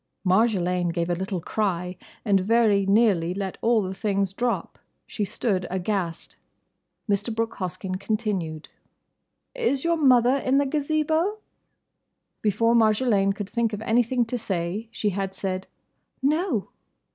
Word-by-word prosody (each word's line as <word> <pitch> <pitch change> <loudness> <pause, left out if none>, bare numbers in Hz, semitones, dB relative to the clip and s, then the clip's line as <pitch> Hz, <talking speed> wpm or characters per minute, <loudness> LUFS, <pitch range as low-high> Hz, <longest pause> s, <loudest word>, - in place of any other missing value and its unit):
Marjolaine 180 -3 +2
gave 170 0 -1
a - - +3
little 190 +1 -3
cry 180 -1 -2 0.3
and 200 -3 +4
very 205 -1 +3
nearly 195 -5 +3
let 195 -1 -4
all 230 -2 +3
the 185 0 -4
things 195 -1 -1
drop. 240 +4 -2 0.3
She 210 - -3
stood 195 -3 -1
aghast. 185 -2 -3 0.7
Mr. 205 +2 0
Brooke 225 0 -2
Hoskyn 185 +1 -4
continued, 195 -8 -2 0.9
"Is 460 - 0
your 335 0 +2
mother 255 -3 +5
in 265 0 +1
the 285 - +3
Gazebo?" 310 +7 0 1.0
Before 220 +3 +2
Marjolaine 215 -3 +3
could 205 -1 -5
think 235 -2 0
of 210 - -4
anything 240 +1 +2
to 245 +2 -3
say 190 +1 -3
she 210 -3 -1
had 195 0 -3
said 190 0 -3 0.5
"No." 290 - 0
210 Hz, 135 wpm, -25 LUFS, 190-235 Hz, 1.0 s, mother